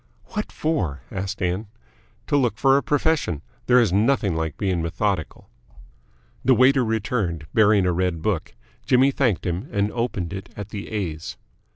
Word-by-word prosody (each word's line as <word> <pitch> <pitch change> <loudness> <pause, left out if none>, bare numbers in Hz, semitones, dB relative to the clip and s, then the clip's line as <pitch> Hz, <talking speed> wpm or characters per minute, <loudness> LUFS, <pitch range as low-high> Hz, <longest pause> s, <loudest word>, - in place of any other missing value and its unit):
"What 210 0 -4
for?" 115 - -2
asked 95 -1 -4
Ann. 90 +5 -1 0.6
"To - - 0
look 125 -5 +2
for 135 0 +4
a 140 - +3
profession. 145 - 0 0.2
There 125 0 +6
is 110 -7 +2
nothing 105 -3 +2
like 80 -2 -2
being 95 -4 0
methodical." 85 +1 -2 1.0
The 130 0 +5
waiter 130 +1 +5
returned, 110 -8 -1
bearing 105 -3 +4
a 90 - +2
red 90 -2 -1
book. 95 -11 -2 0.3
Jimmy 130 +2 +4
thanked 125 -9 0
him 90 - -3
and 100 0 0
opened 110 -7 -2
it 95 0 -7
at 100 0 -6
the 105 -1 -6
A's. 85 -7 -4
100 Hz, 160 wpm, -23 LUFS, 90-125 Hz, 1.0 s, There